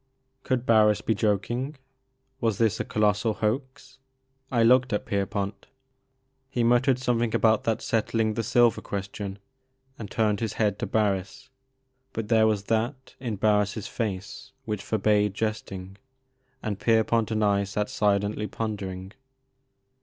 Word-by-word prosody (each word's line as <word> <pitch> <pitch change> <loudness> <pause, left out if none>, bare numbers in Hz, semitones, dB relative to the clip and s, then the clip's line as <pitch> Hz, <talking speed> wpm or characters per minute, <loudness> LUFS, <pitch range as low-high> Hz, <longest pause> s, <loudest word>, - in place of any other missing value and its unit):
Could 130 -2 -1
Barris 105 -3 +4
be 110 - +1
joking? 120 +7 -1 0.6
Was 115 -5 0
this 110 -1 +2
a - - 0
colossal 105 +1 +1
hoax? 130 +5 -3 0.5
I 120 -3 +3
looked 125 +2 +5
at 105 - -1
Pierpont. 100 0 -2 0.8
He 120 -3 0
muttered 125 +2 +3
something 120 -3 0
about 110 -1 +3
that 115 -1 0
settling 110 0 0
the 115 - -1
silver 120 0 +3
question, 100 0 -5 0.6
and 105 -3 -6
turned 105 -2 +1
his 115 -2 -2
head 105 -3 0
to - - -2
Barris, 100 -3 -1 0.6
but 110 -1 -4
there 110 -2 +5
was 105 -2 0
that 120 +5 -2
in 120 -5 -3
Barris' 105 0 +1
face 100 -4 -5
which 105 -3 -3
forbade 105 -1 +1
jesting, 100 -3 -4 0.7
and 105 -3 -3
Pier 115 -1 +3
pont 115 -1 +1
and 110 -1 0
I 100 -1 +2
sat 105 +1 -2
silently 105 +1 0
pondering. 95 -4 -5
110 Hz, 140 wpm, -26 LUFS, 100-115 Hz, 0.8 s, looked